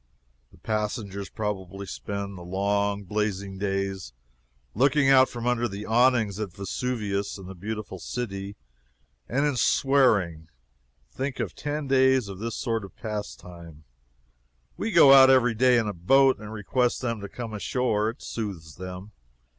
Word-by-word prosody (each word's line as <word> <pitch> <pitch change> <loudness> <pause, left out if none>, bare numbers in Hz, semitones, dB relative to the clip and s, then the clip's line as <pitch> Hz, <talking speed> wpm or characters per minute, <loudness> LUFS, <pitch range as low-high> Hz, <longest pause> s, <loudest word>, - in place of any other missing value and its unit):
The - - -19
passengers 105 -2 -3
probably 100 -2 -4
spend 100 0 -5
the 90 - -10
long, 100 +3 -1
blazing 100 -1 -3
days 95 -6 -3 0.6
looking 135 +3 +3
out 130 -1 +6
from 120 -1 -6
under 120 -1 +1
the 100 0 -7
awnings 115 -3 +2
at 105 -4 -3
Vesuvius 100 0 -3
and 95 -2 -10
the 95 - -7
beautiful 105 0 -6
city 100 -3 -5 0.7
and 140 +6 +1
in 145 -2 +1
swearing. 105 - +2 0.6
Think 135 -1 -4
of 110 -8 -3
ten 150 0 -4
days 130 -4 +3
of 95 -1 -8
this 115 +1 -4
sort 115 -4 -2
of 100 - -11
pastime! 90 -7 -8 0.9
We 220 - -3
go 155 -7 +8
out 135 -1 +9
every 125 -3 +4
day 125 +2 +4
in 115 -2 +1
a 105 - -2
boat 135 +10 +4
and 105 0 -9
request 120 +4 0
them 115 -3 -2
to 100 - -7
come 115 -3 -7
ashore. 110 0 0
It 115 - -9
soothes 90 -10 -6
them. 95 +3 -8
105 Hz, 150 wpm, -26 LUFS, 100-125 Hz, 0.9 s, out